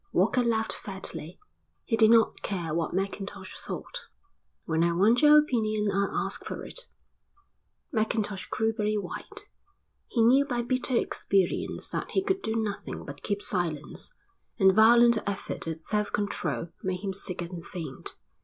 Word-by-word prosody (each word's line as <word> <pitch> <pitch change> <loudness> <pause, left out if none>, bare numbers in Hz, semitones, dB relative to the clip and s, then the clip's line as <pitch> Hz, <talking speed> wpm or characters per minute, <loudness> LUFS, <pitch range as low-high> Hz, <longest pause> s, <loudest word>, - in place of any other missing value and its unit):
Walker 230 +7 +3
laughed 225 -2 +1
fatly. 190 -4 -6 0.5
He 225 - +1
did 220 -1 +6
not 230 -1 +4
care 170 -6 -3
what 165 0 -1
Mackintosh 195 +1 -4
thought. - - -6 0.6
"When 160 0 +1
I 170 0 +2
want 210 +9 +4
your 300 0 +8
opinion 215 -8 +2
I'll 200 +1 0
ask - - -3
for - - -6
it." - - -2 1.0
Mackintosh 215 - -1
grew 225 0 0
very 215 -1 0
white. 195 -4 -5 0.6
He 230 - +2
knew 260 +5 +6
by 245 -4 -2
bitter 255 0 +1
experience 195 -5 0
that - - -3
he 385 - +2
could 385 -1 0
do 220 - -2
nothing 215 -3 -3
but 140 0 -9
keep 205 -1 -1
silence, 175 - -2 0.4
and 190 -3 +6
the - - -3
violent 235 +2 +6
effort 200 -4 -3
at 160 0 -5
self 210 -1 0
control 175 -6 -2
made 185 -1 -2
him 195 -2 -2
sick 180 -2 -3
and 170 -1 -7
faint. 160 -9 -6
210 Hz, 155 wpm, -28 LUFS, 185-235 Hz, 1.0 s, your